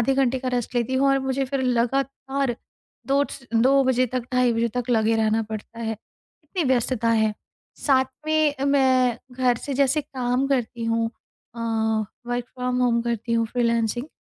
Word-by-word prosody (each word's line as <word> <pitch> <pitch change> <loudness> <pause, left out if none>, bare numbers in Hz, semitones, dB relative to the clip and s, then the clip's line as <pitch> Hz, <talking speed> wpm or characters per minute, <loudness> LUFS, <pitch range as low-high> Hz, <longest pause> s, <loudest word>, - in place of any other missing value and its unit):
आधे 265 +4 +2
घंटे 265 -1 +2
का 255 0 -3
रेस्ट 245 +1 -3
लेती 240 +2 0
हूँ 275 +1 +3
और 275 0 +4
मुझे 270 +1 0
फिर 270 +1 -2
लगातार 270 +1 0 0.5
2 275 +1 +3
स 260 - -9
2 265 +4 +5
बजे 255 0 +3
तक 250 +1 -3
ढ़ाई 250 -1 +3
बजे 230 +1 +1
तक 245 0 -2
लगे 225 -1 +3
रहना 220 0 +2
पड़ता 220 +1 -8
है। 225 -1 -2
इतनी 305 - -7
व्यस्तता 245 -2 +1
है। 220 -1 +2 0.5
साथ 265 -2 +3 0.2
में 310 -2 +2
मैं 260 -4 +3 0.2
घर 250 -2 +2
से 280 - -4
जैसे 280 +2 +2
काम 260 -2 -1
करती 240 -3 -1
हूँ 230 0 +1 0.5
अ, 235 - -7 0.7
वर्क 245 0 -2
फ्रॉम 250 0 -1
होम 235 -1 +3
करती 235 0 -2
हूँ 230 -1 +2
फ्रीलांसिंग। 235 +1 0
250 Hz, 175 wpm, -24 LUFS, 230-270 Hz, 0.7 s, 2